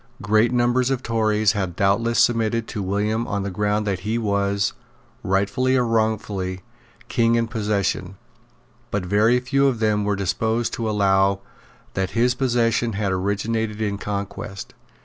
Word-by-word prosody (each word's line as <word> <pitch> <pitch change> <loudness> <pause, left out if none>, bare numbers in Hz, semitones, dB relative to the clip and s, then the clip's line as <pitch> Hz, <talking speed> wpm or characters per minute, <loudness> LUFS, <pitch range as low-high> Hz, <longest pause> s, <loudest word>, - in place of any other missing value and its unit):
Great 110 +2 +3
numbers 120 +1 +2
of 135 -2 -1
Tories 110 -2 +2
had 95 -5 -3
doubtless 115 +4 +1
submitted 115 -1 +2
to 105 - -4
William 105 +4 -1
on 100 -1 -2
the 100 - -3
ground 105 +2 0
that 95 -3 -1
he 110 +5 -2
was, 100 -2 0 0.5
rightfully 100 +7 +1
or 125 - +2
wrongfully, 105 -5 -1 0.5
King 115 -1 +2
in 115 0 +1
possession; 100 -4 -1 0.7
but 100 -3 -2
very 110 +6 +3
few 140 +2 +2
of 130 -3 +1
them 105 -2 +1
were 100 0 0
disposed 110 +4 -1
to 115 -2 -2
allow 100 -1 +2 0.5
that 95 +3 -2
his 125 +1 +3
possession 120 -3 +1
had 100 -1 -1
originated 105 +3 -1
in 100 -2 -2
conquest. 100 +3 -5
105 Hz, 150 wpm, -22 LUFS, 100-115 Hz, 0.7 s, Great